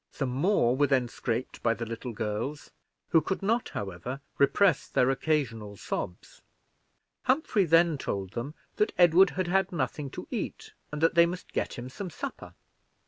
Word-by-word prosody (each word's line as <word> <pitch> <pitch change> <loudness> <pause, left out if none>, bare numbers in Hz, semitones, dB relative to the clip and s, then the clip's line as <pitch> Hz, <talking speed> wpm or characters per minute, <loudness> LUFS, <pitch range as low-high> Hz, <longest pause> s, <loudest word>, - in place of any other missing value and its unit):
Some 135 -3 -2
more 135 - +2
were 145 +2 +3
then 130 -3 +2
scraped 120 0 -3
by 115 -1 +2
the 115 +2 -4
little 115 +2 -5
girls, 110 +6 -4 0.4
who 165 - +5
could 190 +6 -3
not, 230 +4 +1
however, 100 +7 -5 0.2
repress 145 +5 +4
their 125 +1 +3
occasional 115 -9 -1
sobs. 90 - -5 0.8
Humphrey 255 -7 +2
then 165 -2 +4
told 95 -6 -3
them 125 +8 -5 0.2
that 210 - +2
Edward 180 +2 +7
had 185 - +1
had 190 +2 +1
nothing 150 -4 -2
to - - -7
eat, - - -5 0.2
and 150 +1 -4
that 165 - +4
they 170 0 +6
must 180 +1 -7
get - - -1
him 120 +1 -6
some 180 +9 -6
supper. 155 - -7
140 Hz, 165 wpm, -28 LUFS, 120-175 Hz, 0.8 s, Edward